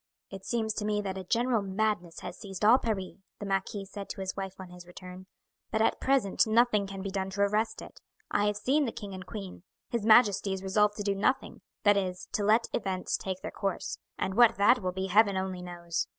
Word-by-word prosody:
"It 195 -1 -8
seems 220 -1 -1
to 210 - -3
me 210 0 0
that 190 -1 -4
a - - -6
general 235 +4 +1
madness 195 -3 -2
has 175 - -6
seized 195 +1 -5
all 240 +5 +7
Paris," 200 -5 -3 0.2
the 205 - -6
marquis 195 +1 -2
said 200 0 -8
to - - -6
his 190 0 -4
wife 195 -1 -5
on 185 -1 -9
his 180 0 -12
return, 180 +1 -11 0.4
"but 220 - -1
at 220 - +2
present 260 -7 +2
nothing 220 -2 +3
can 195 -1 -7
be 195 - -4
done 190 -1 -2
to 200 +1 -3
arrest 210 +2 +1
it. - - -13 0.3
I 205 - +2
have 210 0 0
seen 280 +7 +2
the 235 - -2
king 205 -3 -8
and 185 -1 -8
queen. 195 -6 -7 0.3
His 235 -3 -1
majesty 205 -3 +5
is 190 0 -5
resolved 210 +2 +2
to 205 - -3
do 200 -1 +1
nothing; 255 +7 -1 0.2
that 205 -1 +5
is, 185 -2 -3
to 210 - -1
let 220 +3 +4
events 190 -4 -1
take 190 -1 -4
their - - -4
course, 195 -3 -3 0.2
and 190 - -2
what 235 +2 +6
that 215 +5 +4
will 185 -1 -1
be 190 +1 -3
Heaven 200 +1 +4
only 190 -1 -3
knows. 175 -1 -3
200 Hz, 225 wpm, -29 LUFS, 190-215 Hz, 0.4 s, all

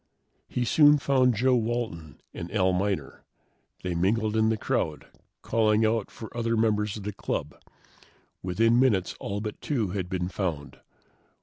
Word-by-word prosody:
He 125 - -1
soon 150 +4 +6
found 130 -3 +2
Joe 130 +5 +3
Walton 110 - -3
and 85 - -7
Al 95 -3 +2
Miner. 95 -6 -2 0.6
They 90 -1 -2
mingled 105 +5 +1
in 110 0 +3
the 110 - +1
crowd, 80 -6 -2 0.4
calling 110 -1 +2
out 110 -1 0
for 110 0 -10
other 115 -1 0
members 105 -2 +1
of 105 - -8
the 105 +1 -4
club. 75 -5 -4 0.9
Within 115 +6 +2
minutes, 105 -9 +2
all 100 +1 -4
but 105 -1 -6
two 120 -10 -1
had 90 -1 -3
been 90 -1 -2
found. 85 -7 -4
105 Hz, 150 wpm, -27 LUFS, 95-115 Hz, 0.9 s, soon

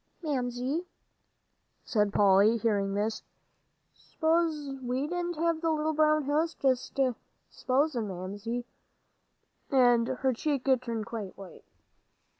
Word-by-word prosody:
"Mamsie," 265 +3 -2 1.0
said 210 -3 +1
Polly, 205 +3 +5
hearing 200 -3 0
this, 215 +2 -1 0.7
"s'posin' 310 -5 -1
we 255 +3 0
didn't 350 +2 -3
have 330 0 0
the 330 - +1
little 310 0 0
brown 305 0 +3
house; 310 +4 0
just 260 0 -1 0.5
s'posin', 255 -3 0
Mammy," 205 +6 -5 1.0
and 245 -3 +4
her 260 0 0
cheek 275 +2 -2
turned 230 -3 -4
quite 220 -5 -6
white. 195 -2 -12
255 Hz, 105 wpm, -29 LUFS, 225-305 Hz, 1.0 s, Polly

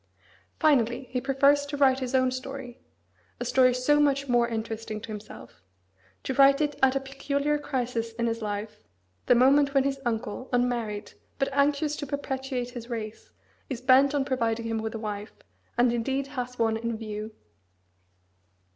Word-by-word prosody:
Finally, 255 -5 +3
he 250 0 -1
prefers 275 +2 +3
to 285 0 -5
write 265 -2 +4
his 255 0 -2
own 255 -1 +3
story, 255 -1 -7 0.6
a - - -3
story 255 -1 +4
so 255 +4 +2
much 280 -1 +2
more 240 -1 +3
interesting 225 -1 -4
to 230 - -10
himself; 205 - -10 0.6
to 265 - -2
write 275 +1 +6
it 295 -1 0
at 265 0 +4
a - - +2
peculiar 280 +2 -1
crisis 245 -5 -2
in 235 +1 -2
his 230 0 -1
life, 210 0 -4 0.5
the 245 - +6
moment 275 +3 +4
when 270 - +5
his 275 0 -1
uncle, 230 +1 -3
unmarried, 240 -4 -1 0.3
but 275 - 0
anxious 285 +2 +1
to 290 - -5
perpetuate 265 -3 -3
his 240 -1 -8
race, 220 -2 -6 0.4
is 260 -4 -3
bent 265 +3 +5
on 275 -2 +1
providing 230 -4 -1
him 225 -1 -1
with 220 +1 -4
a - - -4
wife, 210 -1 -5 0.4
and 240 0 +4
indeed 265 +4 -1
has 250 -3 -5
one 225 -1 +1
in 230 0 -3
view. 215 0 -6
250 Hz, 165 wpm, -27 LUFS, 230-275 Hz, 0.6 s, write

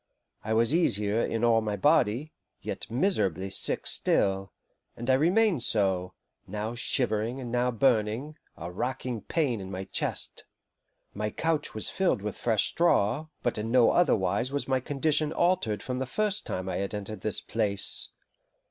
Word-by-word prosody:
I 110 +1 -1
was 115 +5 +4
easier 105 - +2
in 115 0 -2
all 115 -1 +4
my 105 -1 -2
body, 140 +3 +2 0.3
yet - - -5
miserably 105 - 0
sick - - +1
still, 95 -1 +1 0.5
and 120 +3 -1
I - - +5
remained 175 - +3
so, 95 -5 +1 0.3
now 105 +3 -4
shivering 120 0 -1
and 120 -3 -6
now 125 +1 +1
burning, 120 +3 +1 0.2
a 85 +2 -6
racking 125 +3 -3
pain 135 -10 -1
in 95 - -7
my 95 0 -5
chest. 95 - -1 0.7
My 105 +1 -2
couch 155 +3 -2
was 110 - +2
filled 185 - 0
with 105 -1 -4
fresh 110 -4 +1
straw, 150 -4 +1 0.2
but 120 - -1
in 110 +2 -3
no 120 -1 +5
other 175 - +4
wise 95 +6 -1
was 145 0 -2
my 130 -1 +1
condition 150 +3 0
altered 175 - +1
from 125 0 -3
the 130 - -3
first 210 +6 -1
time 90 0 -4
I - - -2
had 100 +2 -3
entered 105 +1 -6
this 110 - +2
place. 100 -3 0
115 Hz, 165 wpm, -28 LUFS, 105-140 Hz, 0.7 s, I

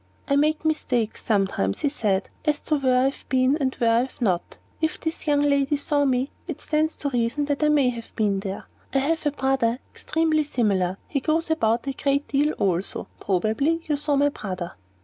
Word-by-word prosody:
"I 280 - +2
make 305 +2 +2
mistakes 245 -8 0
sometimes," 195 - 0
he 290 - +2
said, 205 -8 0 0.2
"as 300 -1 +1
to 305 - 0
where 255 -2 +3
I 265 - +4
have 275 - -11
been 260 +1 +3
and 265 -2 0
where 235 -3 +2
I 230 - +4
have 255 +2 -4
not. 185 -8 -1 0.2
If 320 +2 0
this 320 -1 -4
young 290 -1 +3
lady 280 0 +2
saw 285 0 +1
me 260 0 +1 0.2
there, - - -3
it - - -22
stands 310 +1 0
to 285 - -3
reason 245 +4 0
that 285 0 -1
I 300 - +4
may 285 -4 +4
have 235 -2 -7
been 205 -3 +1
there. 195 0 -5 0.3
I - - +5
have 305 +3 +1
a - - +2
brother 265 -4 +1 0.2
extremely 315 -1 +1
similar. 195 -9 0
He 280 - -1
goes 320 +3 0
about 230 -6 +1
a 275 - -1
good 280 +1 0
deal 290 +2 +1
also. 185 -1 -1
Probably 220 - 0
you 300 - +1
saw 290 0 0
my 285 +1 +4
brother." 185 -9 -5
275 Hz, 210 wpm, -24 LUFS, 230-295 Hz, 0.3 s, I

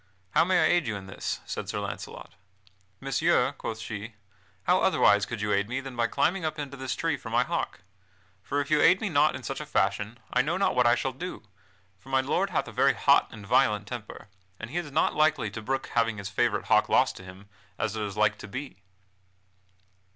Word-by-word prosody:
"How - - +4
may 180 +1 +2
I - - +5
aid 175 -6 +2
you 110 - -2
in 100 -1 -7
this?" 95 - -4
said - - -5
Sir - - -3
Launcelot. - - -7 0.7
"Messire," 135 0 +2
quoth 115 -5 -6
she, 110 0 -7 0.5
"how - - +3
otherwise 100 0 +4
could 115 -3 -5
you 105 0 0
aid 100 +2 +1
me 125 +2 -1
than 135 -1 -8
by 115 -1 +1
climbing 185 +9 0
up 155 0 -2
into 140 -2 -5
this 130 -1 -3
tree - - -1
for - - -9
my - - +3
hawk? - - -3 0.6
For 145 +7 -2
if 145 +1 -3
you 155 - +4
aid 185 +3 +6
me 215 - -2
not 150 -3 +3
in 130 - -8
such 135 +4 -4
a - - -6
fashion, 100 -1 0 0.2
I 125 - +4
know 160 +7 -1
not 195 - +2
what 125 -1 +3
I 120 - +5
shall 135 - -2
do, 180 +2 -7 0.6
for 135 - -16
my 135 0 +3
lord 180 +9 0
hath 175 - -1
a - - -7
very - - +3
hot - - +4
and 105 -3 -10
violent 105 +1 +2
temper, 120 -4 -8 0.3
and 115 +2 -7
he 165 - -3
is 175 -4 -3
not 155 - +2
likely 150 -8 +2
to 110 - -6
brook 135 +4 -3
having 115 -2 +1
his 100 -1 -5
favorite 105 - 0
hawk - - +3
lost - - +3
to 95 - -10
him, 95 +2 -12 0.3
as 110 0 -2
it 110 - -3
is 100 -1 -4
like 105 -1 +2
to - - -8
be." 130 -4 -7
125 Hz, 225 wpm, -27 LUFS, 105-150 Hz, 0.7 s, aid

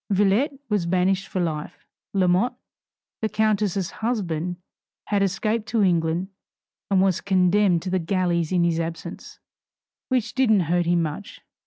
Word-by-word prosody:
Villette 205 - +2
was 205 -5 0
banished 185 +2 +1
for 185 - -3
life. 155 -4 -4 0.3
Lamotte, 190 +6 +2 0.7
the 220 - 0
countess' 210 -4 0
husband, 180 -7 -2 0.5
had 205 -1 +2
escaped 215 +3 0
to 220 -2 +1
England, 170 0 +1 0.6
and 190 -1 +4
was 190 -3 +1
condemned 185 -1 +3
to 185 - -4
the 185 - +1
galleys 170 -1 0
in 180 -2 +2
his 170 -1 +1
absence, 165 0 -6 0.7
which 245 -4 0
didn't 225 -6 +3
hurt 175 +1 0
him 170 -1 +3
much. 155 +6 -6
185 Hz, 140 wpm, -24 LUFS, 170-210 Hz, 0.7 s, and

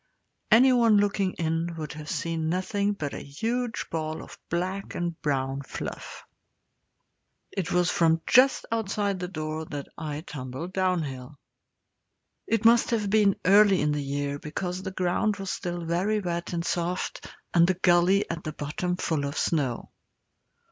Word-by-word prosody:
Anyone 235 -2 +6
looking 200 -2 +1
in 165 +1 -1
would 155 -3 -5
have 150 0 -8
seen 165 -1 -2
nothing 200 +3 0
but 150 -8 -4
a - - -5
huge 230 - -2
ball 155 -1 -3
of - - -13
black 185 +3 -2
and 170 -1 -3
brown 135 -1 -1
fluff. 135 - -7 1.3
It 190 -4 -3
was 180 0 +2
from 165 -1 +3
just 260 +2 +5
outside 205 -3 -1
the 180 - -3
door 155 -2 -4
that 145 -2 -6
I 150 -2 -4
tumbled 140 +3 -7
downhill. 150 -8 -1 1.1
It 225 0 0
must 235 +1 +6
have 215 -4 0
been 205 -2 +4
early 200 -1 +6
in 150 0 +1
the 150 0 -1
year, 140 0 -2
because 180 +5 -4
the 190 - -4
ground 185 +3 0
was 195 -1 -4
still 175 -1 -4
very 185 +6 +1
wet 170 -3 -3
and 170 -1 -2
soft, 175 +1 -2 0.3
and 170 0 +6
the 185 - +2
gully 180 +2 +4
at 170 -1 -5
the 155 - -4
bottom 180 +5 -3
full 160 -5 -1
of 140 +2 -4
snow. 135 -7 -1
175 Hz, 155 wpm, -27 LUFS, 155-195 Hz, 1.3 s, Anyone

